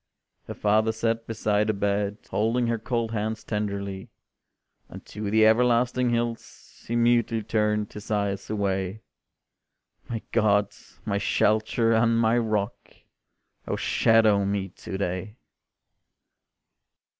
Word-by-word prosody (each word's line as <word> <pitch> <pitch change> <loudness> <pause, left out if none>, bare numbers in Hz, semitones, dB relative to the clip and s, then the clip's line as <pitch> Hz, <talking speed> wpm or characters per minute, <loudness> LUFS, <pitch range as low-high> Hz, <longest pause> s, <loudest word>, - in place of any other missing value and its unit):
Her - - -6
father 110 +2 +2
sat 115 +1 -2
beside 105 -1 0
the 110 - +1
bed, 100 0 -1
Holding 115 +3 +1
her 115 -1 -1
cold 115 0 -2
hands 110 0 -3
tenderly, 100 -2 -4 0.8
And - - -11
to 105 0 -5
the 110 +1 +4
everlasting 125 +2 +3
hills 120 -1 -4
He 120 - -2
mutely 115 -1 +2
turned 105 -1 0
his 105 0 -9
eyes 100 -2 -1
away: 100 -1 -2 1.1
"My 115 -2 -4
God, 105 -3 +2 0.3
my 100 -2 0
Shelter, 110 +3 +2
and 115 +1 +3
my 115 0 +3
Rock, 110 -1 -3 0.7
Oh - - -1
shadow 110 -3 +3
me 100 -1 -2
to 95 +2 -7
day!" 95 +2 -3
110 Hz, 120 wpm, -25 LUFS, 100-115 Hz, 1.1 s, the